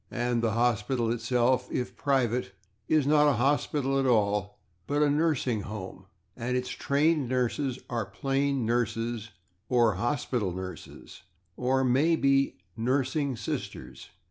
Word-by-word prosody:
And 120 -1 -1
the 115 -2 +1
hospital 115 0 +1
itself, 120 +2 +1
if 125 - -3
private, 125 -7 0 0.3
is 155 -3 +3
not 150 0 +5
a - - +3
hospital 135 +2 +1
at 135 - +1
all, 105 -3 +1 0.3
but 145 +1 +2
a - - +5
/nursing 145 -7 +1
home/, 100 -2 -8 0.3
and 125 +2 -2
its 125 0 -3
trained 145 -1 +1
nurses 130 +1 0
are 115 -4 -2
plain 135 -2 -1
/nurses/, 115 -1 -1 0.4
or 115 -6 +3
/hospital 120 -5 -1
nurses/, 95 -2 -9 0.3
or 130 +1 +1
maybe 135 +1 +2 0.2
/nursing 130 +3 0
sisters - - -6
125 Hz, 125 wpm, -28 LUFS, 115-140 Hz, 0.4 s, not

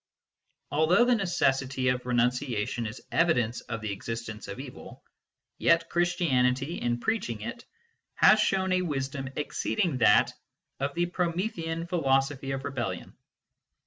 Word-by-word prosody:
Although 165 +9 +4
the 250 - +4
necessity 135 - +1
of 125 0 -1
renunciation 120 -1 0
is 110 +4 -8
evidence 125 -9 +2
of 115 -1 -6
the 110 -1 -3
existence 110 +1 -6
of - - -7
evil, 135 -2 -10 0.6
yet 165 0 +3
Christianity, 140 -4 +1
in 120 0 0
preaching 120 - -2
it, 235 - -6 0.5
has 215 - +6
shown 190 -2 +1
a 185 0 +3
wisdom 135 -4 -3
exceeding 150 +1 -1
that 110 -3 +5 0.5
of 140 +1 -2
the 175 +1 +2
Promethean 170 -2 -2
philosophy 135 -5 0
of 135 0 -3
rebellion. 120 -10 -4
135 Hz, 125 wpm, -28 LUFS, 125-170 Hz, 0.6 s, has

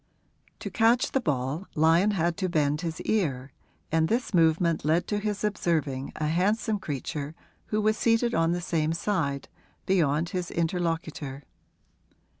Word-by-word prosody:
To - - -5
catch 235 +2 +3
the 270 - +1
ball 145 - -2
Lyon 165 +6 +4
had 175 -4 +1
to 190 -2 -1
bend 150 -2 +1
his 165 -2 -4
ear, 140 -11 -1 0.4
and 160 0 +3
this 235 +2 -1
movement 165 -1 +3
led 165 +4 +2
to 210 - 0
his 210 0 -3
observing 155 -10 -1
a 155 - -2
handsome 205 +6 +1
creature 145 0 -4 0.3
who 215 - 0
was 215 +1 +2
seated 230 +1 +2
on 165 0 +2
the 175 0 -1
same 160 -2 0
side, 165 -7 -1 0.4
beyond 165 -3 +2
his 180 -2 -3
interlocutor. 165 -5 -2
165 Hz, 145 wpm, -27 LUFS, 155-200 Hz, 0.4 s, Lyon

